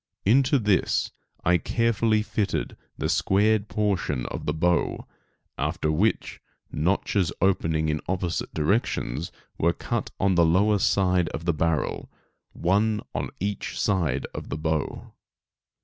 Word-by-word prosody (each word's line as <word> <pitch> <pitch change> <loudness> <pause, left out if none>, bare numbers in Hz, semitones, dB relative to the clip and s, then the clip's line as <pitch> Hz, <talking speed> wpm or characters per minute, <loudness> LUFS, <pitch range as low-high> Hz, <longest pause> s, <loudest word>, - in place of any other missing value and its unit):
Into 130 +7 +4
this 105 -6 +1 0.3
I 90 0 +4
carefully 115 0 +1
fitted 105 -2 -2 0.2
the - - -1
squared 105 +2 +2
portion 95 - -1
of - - -6
the - - +2
bow, 85 +2 0 0.5
after 75 - 0
which 100 +9 0 0.3
notches 90 +2 0
opening 80 -4 +1
in 75 -1 -1
opposite 90 -2 -2
directions 80 - -1 0.3
were 85 +1 +3
cut - - -3
on 95 0 +3
the 85 -1 +4
lower 100 +5 +3
side 90 -3 +2
of 80 - -6
the 85 - +2
barrel, 75 0 -1 0.4
one 105 +4 +1
on - - -2
each 100 +1 -3
side 80 -10 0
of - - -7
the - - -3
bow. 80 -1 -3
95 Hz, 130 wpm, -25 LUFS, 80-105 Hz, 0.5 s, Into